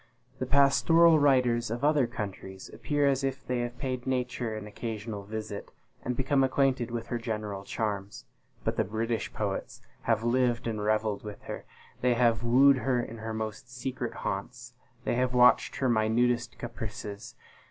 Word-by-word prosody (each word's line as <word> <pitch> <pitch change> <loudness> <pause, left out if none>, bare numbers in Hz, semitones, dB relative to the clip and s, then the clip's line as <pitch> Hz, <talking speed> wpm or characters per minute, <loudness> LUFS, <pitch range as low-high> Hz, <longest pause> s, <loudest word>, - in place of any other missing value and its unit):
The 130 - -2
pastoral 140 +5 +5
writers 125 -5 +3
of 120 +4 -4
other 145 -4 +4
countries 100 -5 -7
appear 145 -1 0
as 135 -1 +1
if 135 0 -2
they 125 -1 -1
had 120 0 -3
paid 130 -1 -3
Nature 125 -3 -1
an 105 -1 -6
occasional 105 0 -5
visit, 110 -1 -6 0.3
and 125 - -2
become 135 +1 +2
acquainted 130 -2 +2
with 115 -1 -4
her 120 - -1
general 105 -4 -4
charms; 100 -1 -4 0.4
but - - -1
the - - +3
British 110 +3 -2
poets - - -3 0.3
have 115 -1 +3
lived 120 0 +1
and 110 -2 -2
revelled 110 -1 0
with 105 -1 -8
her - - -7 0.4
they 125 -1 +3
have 115 -2 +3
wooed 130 +4 +6
her 130 -1 +1
in 115 -1 -5
her 110 0 -4
most 110 +2 -5
secret 125 -1 -4
haunts 120 +5 -4 0.3
they - - 0
have 125 +1 0
watched 125 -1 +5
her 130 - 0
minutest 120 +2 +1
caprices. 110 -3 -7
120 Hz, 165 wpm, -29 LUFS, 110-130 Hz, 0.4 s, wooed